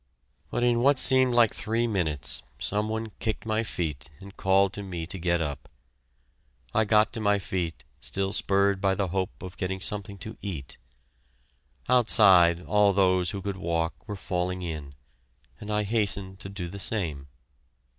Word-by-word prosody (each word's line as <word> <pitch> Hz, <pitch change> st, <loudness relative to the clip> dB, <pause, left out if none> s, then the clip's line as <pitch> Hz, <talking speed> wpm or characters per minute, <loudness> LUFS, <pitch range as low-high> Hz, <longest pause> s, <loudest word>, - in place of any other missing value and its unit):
But 120 Hz, -, -1 dB
in 120 Hz, -1 st, +3 dB
what 135 Hz, +3 st, +4 dB
seemed 130 Hz, -1 st, +5 dB
like 115 Hz, -3 st, +5 dB
three 115 Hz, +3 st, -1 dB
minutes, 85 Hz, -10 st, -1 dB, 0.2 s
some 105 Hz, +1 st, -1 dB
one 110 Hz, 0 st, -3 dB
kicked 110 Hz, -1 st, -3 dB
my 110 Hz, 0 st, 0 dB
feet 80 Hz, -10 st, -4 dB
and 100 Hz, 0 st, -12 dB
called 95 Hz, +1 st, +2 dB
to 105 Hz, -, -6 dB
me 90 Hz, -4 st, -5 dB
to 95 Hz, +2 st, -6 dB
get 85 Hz, 0 st, +1 dB
up. 75 Hz, -2 st, -6 dB, 1.0 s
I 110 Hz, -, +3 dB
got 105 Hz, +1 st, +3 dB
to -, -, -3 dB
my 105 Hz, -1 st, +2 dB
feet, 90 Hz, -4 st, -4 dB, 0.2 s
still 95 Hz, 0 st, -2 dB
spurred 100 Hz, 0 st, +2 dB
by 95 Hz, -1 st, +2 dB
the 95 Hz, -1 st, -1 dB
hope 95 Hz, +1 st, -3 dB
of 90 Hz, +1 st, -8 dB
getting 95 Hz, -1 st, -3 dB
something 100 Hz, +1 st, -3 dB
to 110 Hz, +3 st, -8 dB
eat. 80 Hz, -10 st, -6 dB, 1.1 s
Outside, 95 Hz, -8 st, +5 dB
all 105 Hz, -1 st, +3 dB
those 95 Hz, -2 st, +2 dB
who 95 Hz, 0 st, -5 dB
could 100 Hz, -1 st, -3 dB
walk 85 Hz, -1 st, -1 dB
were 105 Hz, -, -4 dB
falling 90 Hz, -1 st, -3 dB
in, 75 Hz, -5 st, -6 dB, 0.6 s
and 105 Hz, -, -9 dB
I 105 Hz, 0 st, +1 dB
hastened 100 Hz, -3 st, -1 dB
to 95 Hz, -, -8 dB
do 95 Hz, -3 st, -5 dB
the 100 Hz, +4 st, -8 dB
same. 80 Hz, -10 st, -1 dB
100 Hz, 165 wpm, -27 LUFS, 90-105 Hz, 1.1 s, seemed